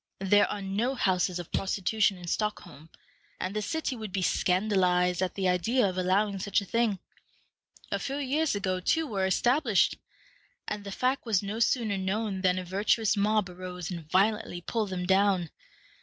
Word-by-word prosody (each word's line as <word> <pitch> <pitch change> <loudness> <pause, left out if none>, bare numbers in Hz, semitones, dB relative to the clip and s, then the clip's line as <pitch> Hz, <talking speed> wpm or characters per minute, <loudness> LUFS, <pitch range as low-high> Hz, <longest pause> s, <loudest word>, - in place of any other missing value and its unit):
There 205 +2 +4
are 205 - -4
no 215 +7 -1
houses 185 -5 +1
of 175 -2 -7
prostitution 195 +1 +1
in 175 - -10
Stockholm, 170 -5 -4 0.5
and 185 +2 -3
the 215 - 0
city 285 +5 -2
would 215 -4 -7
be 190 -1 -1
scandalized 180 -2 +2
at 185 - -1
the 195 -2 0
idea 205 +8 +2
of 185 - -3
allowing 195 +2 +1
such 200 +1 +1
a 200 - -7
thing. 230 -1 +1 0.9
A - - 0
few 275 0 -3
years 290 0 0
ago 185 -2 -1
two 320 - +1
were 195 -8 -1
established, 240 - +2 0.7
and 210 -1 -4
the 200 - -6
fact 255 +6 0
was 210 -3 +2
no 205 +3 -4
sooner 225 -4 +1
known 195 +1 -2
than 185 -1 +2
a 185 - -3
virtuous 205 +4 +1
mob 210 0 +2
arose 180 0 -7
and 165 -3 -7
violently 195 0 +1
pulled 215 +2 -2
them 180 -1 -3
down. 190 -3 +2
195 Hz, 170 wpm, -28 LUFS, 185-215 Hz, 0.9 s, There